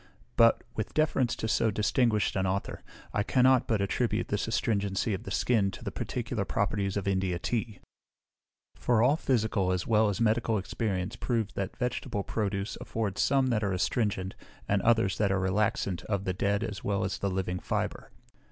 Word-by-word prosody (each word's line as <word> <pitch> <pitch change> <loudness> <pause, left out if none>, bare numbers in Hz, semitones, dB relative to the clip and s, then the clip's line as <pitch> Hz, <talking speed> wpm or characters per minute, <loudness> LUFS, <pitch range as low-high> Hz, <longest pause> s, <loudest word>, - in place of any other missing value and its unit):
But, 115 0 +5
with 110 - -4
deference 135 -6 +2
to 110 - -3
so 110 0 +2
distinguished 105 0 +1
an 95 -1 +1
author, 95 +2 -2 0.3
I - - +1
cannot 130 +3 +4
but 110 -3 +1
attribute 110 +2 0
this 105 +1 -1
astringency 100 -2 0
of 95 - -5
the - - -5
skin 105 0 +2
to - - -9
the - - -3
particular - - -3
properties 100 -1 -1
of 100 - -3
India 95 -2 0
tea; 110 +3 -2 1.0
for 115 -2 +2
all 135 +4 +5
physical 110 - +1
as 90 -2 -1
well 110 -1 +3
as 100 - -2
medical 115 0 +2
experience 95 -1 -2
proves 115 -4 -1
that 95 0 -4
vegetable 125 -5 -2
produce 100 -1 -2
afford 105 -4 -3
some 135 -1 +3
that 110 -2 +1
are 100 -2 0
astringent, 95 0 0 0.3
and 100 -1 +2
others 115 -4 +2
that 100 -2 +2
are 95 - +1
relaxant, 95 -2 0
of 100 -2 -1
the 95 - -1
dead 100 +3 0
as 105 -5 -5
well 100 -2 0
as 95 0 -2
the 100 - 0
living 90 -1 -2
fibre. - - -3
105 Hz, 180 wpm, -29 LUFS, 95-115 Hz, 1.0 s, But